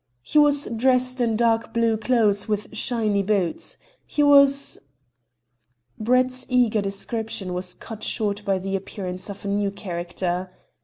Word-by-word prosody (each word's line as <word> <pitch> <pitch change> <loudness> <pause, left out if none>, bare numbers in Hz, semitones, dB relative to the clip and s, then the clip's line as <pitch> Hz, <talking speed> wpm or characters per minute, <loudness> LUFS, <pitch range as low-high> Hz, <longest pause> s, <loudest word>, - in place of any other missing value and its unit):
"He 300 - +2
was 290 -1 +4
dressed 255 +1 +2
in 230 -2 +1
dark 230 0 +1
blue 230 -1 +2
clothes 215 -3 +1
with 210 -1 -3
shiny 215 -4 +1
boots. 195 -4 -1 0.3
He 295 - +1
was 280 -1 +4 0.6
" 120 0 -42
Brett's 255 +3 +1
eager 245 -4 +2
description 200 -1 -3
was 180 0 -4
cut 220 -2 -9
short 210 -1 -1
by 195 -1 +1
the 195 +1 -3
appearance 185 -1 -6
of 200 0 -8
a - - -2
new 200 0 0
character. 180 -1 -4
210 Hz, 145 wpm, -23 LUFS, 190-245 Hz, 0.6 s, was